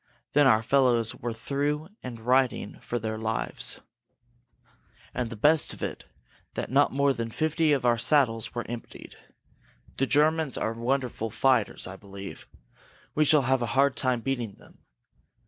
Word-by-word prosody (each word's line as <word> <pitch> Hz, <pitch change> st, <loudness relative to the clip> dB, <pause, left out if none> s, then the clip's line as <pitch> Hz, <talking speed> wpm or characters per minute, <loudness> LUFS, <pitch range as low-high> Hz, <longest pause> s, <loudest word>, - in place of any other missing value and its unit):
Then 145 Hz, -1 st, +5 dB
our 110 Hz, -3 st, +4 dB
fellows 120 Hz, -3 st, +3 dB
were 120 Hz, -, -5 dB
through 145 Hz, +7 st, -2 dB
and 120 Hz, -3 st, -7 dB
riding 125 Hz, +2 st, +1 dB
for 120 Hz, -, -3 dB
our 110 Hz, 0 st, -3 dB
lines. 110 Hz, 0 st, -2 dB, 1.3 s
And 125 Hz, -2 st, -2 dB
the 115 Hz, -, -6 dB
best 150 Hz, +8 st, +3 dB
of -, -, -9 dB
it -, -, -5 dB
was -, -, -33 dB, 0.4 s
that -, -, -4 dB
not 140 Hz, +2 st, +4 dB
more 140 Hz, +1 st, +2 dB
than 115 Hz, -2 st, -4 dB
fifty 155 Hz, +4 st, +1 dB
of 135 Hz, -4 st, +1 dB
our 120 Hz, -1 st, +3 dB
saddles 115 Hz, -6 st, +2 dB
were 120 Hz, -, -3 dB
emptied. 120 Hz, 0 st, -8 dB, 0.8 s
The 135 Hz, -, +2 dB
Germans 155 Hz, 0 st, +2 dB
are 110 Hz, -, -1 dB
wonderful 120 Hz, -1 st, -2 dB
fighters, 125 Hz, 0 st, +1 dB
I 95 Hz, +1 st, -8 dB
believe. 100 Hz, 0 st, -10 dB, 0.7 s
We 155 Hz, -, +3 dB
shall 150 Hz, -1 st, +5 dB
have 130 Hz, 0 st, +1 dB
a 120 Hz, -, -1 dB
hard 140 Hz, 0 st, +4 dB
time 125 Hz, -3 st, +1 dB
beating 120 Hz, -5 st, -3 dB
them. -, -, -20 dB
125 Hz, 160 wpm, -27 LUFS, 115-140 Hz, 1.3 s, Then